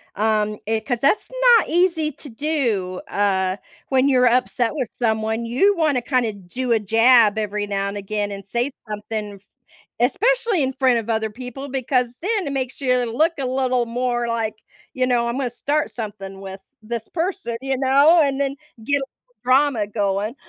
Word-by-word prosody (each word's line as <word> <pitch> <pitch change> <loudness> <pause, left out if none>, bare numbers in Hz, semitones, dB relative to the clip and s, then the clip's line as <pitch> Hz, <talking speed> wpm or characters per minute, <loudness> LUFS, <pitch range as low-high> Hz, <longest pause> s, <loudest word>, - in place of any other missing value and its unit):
um, 215 0 +1
eh, 220 0 +1
'cause 245 +1 -2
that's 280 - +2 0.3
not - - 0
easy 335 -3 +2
to 285 +1 -12
do, 225 -9 -1
uh, 190 -2 0 0.3
when 265 +1 +3
you're 250 -2 +4
upset 245 0 +1
with 260 -7 -2
someone, 220 0 -1
you 330 - +3
wanna 300 -6 +2
kinda 245 -3 0
do 205 +6 -5
a 225 - +3
jab 225 +1 +5
every 210 -1 -2
now 200 -1 -1
and 200 +1 -4
again 205 +1 -3
and 195 -1 -7
say 240 +6 -1 0.2
something, 210 0 -5
f 195 - -18 0.6
Especially 470 -6 +2
in 265 -1 0
front 260 -3 +2
of 225 0 -7
other 220 -1 0
people 255 +4 -8
because 255 -2 0
then 400 -2 -1
it - - -2
makes 260 0 -4
you 250 -2 +1
look 315 +7 +3
a 270 - -1
little 255 -1 0
more 240 0 -1
like, 225 -2 -2 0.4
you 255 -1 0
know, 240 -2 +1
"I'm 235 - -2
gonna 265 -3 -1
start 290 +5 -1
something 195 -4 -7
with 190 0 -8 0.2
this 230 0 -5
person," 350 -7 -3
you 270 0 -1
know, 280 +6 +5
and 275 -2 +1
then 275 0 -1 0.3
get 285 +5 +1
a 275 - -3
little - - -43
drama 255 -4 +3
going. 205 +2 -1
245 Hz, 180 wpm, -21 LUFS, 215-275 Hz, 0.6 s, jab